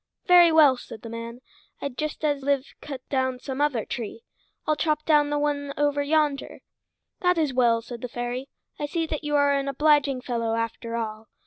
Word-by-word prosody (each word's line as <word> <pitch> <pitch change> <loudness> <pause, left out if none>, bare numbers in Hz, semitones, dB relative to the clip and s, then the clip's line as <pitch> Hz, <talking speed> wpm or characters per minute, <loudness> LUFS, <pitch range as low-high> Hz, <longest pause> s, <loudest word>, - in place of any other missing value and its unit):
"Very 350 -2 +7
well," 300 -5 +6
said 220 - -11
the 230 - -7
man. 230 +1 -7 0.4
"I'd 280 -3 -5
just 305 +1 -3
as 290 -2 +1
lieve 280 0 0
cut 270 -3 -8
down 260 -2 0
some 265 +2 -5
other 275 -7 +1
tree. 240 - -6 0.4
I'll 305 - +2
chop 305 0 0
down 295 -2 +4
the 295 - 0
one 285 -1 -1
over 290 0 +1
yonder." 295 -1 0 0.6
"That 360 -2 +2
is 305 -5 +1
well," 235 -2 +3
said 235 0 -8
the 250 - -3
fairy. 245 +3 -4 0.3
"I 295 - -2
see 330 +2 -1
that 310 -1 -4
you 295 0 -1
are 285 0 +4
an 275 0 0
obliging 285 -1 +2
fellow, 230 -3 -1
after 230 0 -3
all. 220 -1 -4
280 Hz, 195 wpm, -25 LUFS, 245-295 Hz, 0.6 s, Very